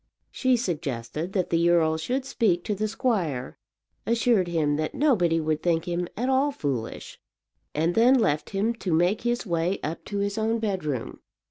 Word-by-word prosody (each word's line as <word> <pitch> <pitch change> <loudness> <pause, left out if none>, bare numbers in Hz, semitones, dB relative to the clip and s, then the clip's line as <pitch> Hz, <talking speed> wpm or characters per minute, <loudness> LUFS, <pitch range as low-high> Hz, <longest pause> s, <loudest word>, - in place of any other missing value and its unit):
She 255 -2 +2
suggested 155 - -3
that 185 -3 -1
the 170 0 +3
earl 160 -2 +3
should 250 +12 -2
speak 200 -10 +1
to 210 - -1
the 215 +2 -1
squire, 185 - -2 0.5
assured 230 -5 +2
him 155 -4 +1
that 155 0 -3
nobody 185 - +3
would 155 -1 -1
think 165 -2 +1
him 175 0 -1
at 245 +3 -1
all 265 +2 +2
foolish, 135 - -4 0.6
and 160 +3 +1
then 240 +5 +5
left 150 - +1
him 205 +4 0
to 190 - -3
make 175 +6 +2
his 240 0 -1
way 170 +1 0
up 155 +3 -4
to 205 - -4
his 200 +2 -1
own 225 +1 +1
bedroom. 185 - -3
180 Hz, 170 wpm, -26 LUFS, 160-225 Hz, 0.6 s, then